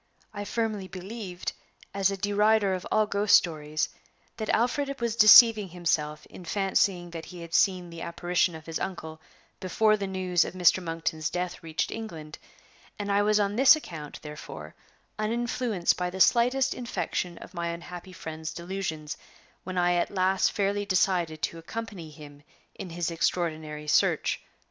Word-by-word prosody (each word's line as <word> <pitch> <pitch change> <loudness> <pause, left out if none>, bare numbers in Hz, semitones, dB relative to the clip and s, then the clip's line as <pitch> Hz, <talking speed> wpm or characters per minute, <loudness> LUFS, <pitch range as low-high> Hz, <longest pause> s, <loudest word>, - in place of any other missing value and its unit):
I 205 -1 -5
firmly 215 -4 -2
believed, 190 0 -6 0.4
as 195 -1 +2
a 195 - -3
derider 205 0 +2
of 185 -1 -4
all 215 0 +3
ghost 205 0 +4
stories, 155 -2 +1 0.5
that 220 -2 -4
Alfred 275 +4 0
was 235 -2 -1
deceiving 215 -1 +8
himself 155 -3 -1
in 185 - -12
fancying 190 -1 0
that 165 -1 -7
he 180 -2 -10
had 170 -1 -10
seen 180 -2 +2
the 165 0 -8
apparition 175 0 0
of 160 0 -10
his 165 -1 -4
uncle 160 -4 -6 0.4
before 215 +3 +2
the 200 -2 -3
news 185 -2 +1
of - - -7
Mr. 185 +1 +4
Monkton's 165 -2 -2
death 180 0 -4
reached 160 -1 -2
England, 160 -9 -7 0.6
and 205 -1 -3
I 200 +1 +3
was 210 +1 +3
on 205 0 0
this 270 +3 +8
account, 160 - -8
therefore, 150 - -9 0.5
uninfluenced 230 -3 0
by 180 0 -1
the 190 +1 -7
slightest 250 +6 +4
infection 185 -7 -3
of - - -12
my 170 -1 -3
unhappy 175 +2 -7
friend's 160 -2 -6
delusions 170 -4 -4 0.5
when 185 0 -5
I 175 0 +3
at 175 - +1
last 190 0 +2
fairly 200 0 0
decided 180 -5 +1
to 165 - -2
accompany 200 -2 -7
him 145 -1 -13 0.3
in 185 - -8
his 170 0 -2
extraordinary 155 -3 -2
search. 150 - +2
180 Hz, 160 wpm, -27 LUFS, 165-205 Hz, 0.6 s, deceiving